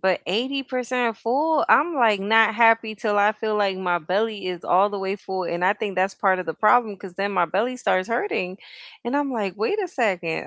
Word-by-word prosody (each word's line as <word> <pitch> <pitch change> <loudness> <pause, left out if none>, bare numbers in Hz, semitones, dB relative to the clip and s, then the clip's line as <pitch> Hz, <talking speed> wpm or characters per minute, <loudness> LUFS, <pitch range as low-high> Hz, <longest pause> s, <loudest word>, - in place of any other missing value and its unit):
But 190 -1 +1
80% 250 +1 -2
full? 290 +7 +1
I'm, 330 +3 +4
like, 225 -6 +3
not 220 +2 +3
happy 225 -1 +3
till 210 0 -2
I 205 +1 +4
feel 215 0 -3
like 195 -2 0
my 180 -2 -1
belly 200 +5 -2
is 180 -2 -5
all 195 +3 +3
the 205 - -5
way 195 +1 -3
full, 190 -1 -5
and 170 +1 -2
I 190 - +4
think 205 -2 -5
that's 190 +1 0
part 190 -2 +1
of 180 - -7
the 160 - -4
problem 215 -2 +3
'cause 185 -2 -11
then 200 +2 -2
my 180 -2 +2
belly 215 +10 -2
starts 185 -6 0
hurting, 205 - -2 0.5
and 245 +4 -2
I'm 285 -1 -1
like, 200 -6 -3
"Wait 225 - -1
a 365 - -4
second." 185 - -2
210 Hz, 220 wpm, -23 LUFS, 185-235 Hz, 0.5 s, I'm